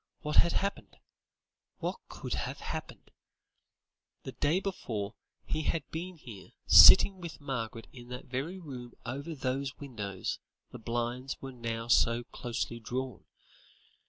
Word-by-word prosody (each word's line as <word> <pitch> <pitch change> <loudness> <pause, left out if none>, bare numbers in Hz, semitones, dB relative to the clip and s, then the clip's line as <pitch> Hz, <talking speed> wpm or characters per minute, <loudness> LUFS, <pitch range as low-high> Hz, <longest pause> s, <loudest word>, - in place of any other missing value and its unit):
What 150 -1 -1
had 170 - +6
happened? 200 +1 -2 0.8
What - - -3
could - - -5
have - - -3
happened? - - -6 1.1
The - - -6
day 155 +6 +1
before, 115 - -3 0.3
he 155 - -1
had 155 -1 -1
been 175 +2 -5
here, 115 -10 -11
sitting 190 -2 +9
with 170 -2 -7
Margaret 115 -5 -4
in 120 -2 -11
that 125 +1 -7
very 135 +9 -3
room 130 -8 -8
over 140 +6 -4
whose 135 0 -2
windows 110 -8 -4 0.3
the 125 - -8
blinds 120 +3 -3
were 135 - -7
now 115 -2 -4
so 120 0 +4
closely 120 -1 -4
drawn. 130 +3 -4
130 Hz, 130 wpm, -31 LUFS, 120-150 Hz, 1.1 s, sitting